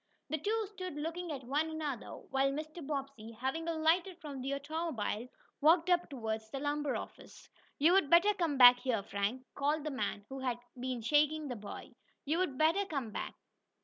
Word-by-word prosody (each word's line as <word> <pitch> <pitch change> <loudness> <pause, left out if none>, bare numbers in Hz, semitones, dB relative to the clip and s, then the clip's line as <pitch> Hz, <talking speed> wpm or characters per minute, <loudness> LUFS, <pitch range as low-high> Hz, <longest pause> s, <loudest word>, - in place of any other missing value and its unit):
The 315 - 0
two 430 +5 0
stood 370 -5 -6
looking 330 +3 -4
at 275 -3 -5
one 290 +6 0
another, 300 -6 -4 0.2
while 270 +1 +2
Mr. 310 +4 -5
Bobbsey, 275 -6 -5
having 270 +6 -2
alighted 335 +3 +1
from 290 -5 -7
the 275 +2 -1
automobile, 280 -7 -3 0.3
walked 330 +4 +5
up 350 0 +3
toward 225 -5 -3
the 270 - -3
lumber 290 0 -1
office. - - -9 0.3
"You'd 330 +1 +4
better 345 +6 +6
come 330 -7 0
back 245 -1 +10
here, 245 -5 0
Frank," 205 +7 -2
called 290 +2 0
the 305 - -3
man 205 -5 -3
who 270 0 -6
had 250 -2 -1 0.2
been 250 -2 -3
shaking 300 +4 +3
the 245 - -3
boy. 210 -2 -8 0.3
"You'd 310 -2 0
better 325 +7 +3
come 275 - -3
back." - - -5
290 Hz, 175 wpm, -33 LUFS, 260-325 Hz, 0.3 s, back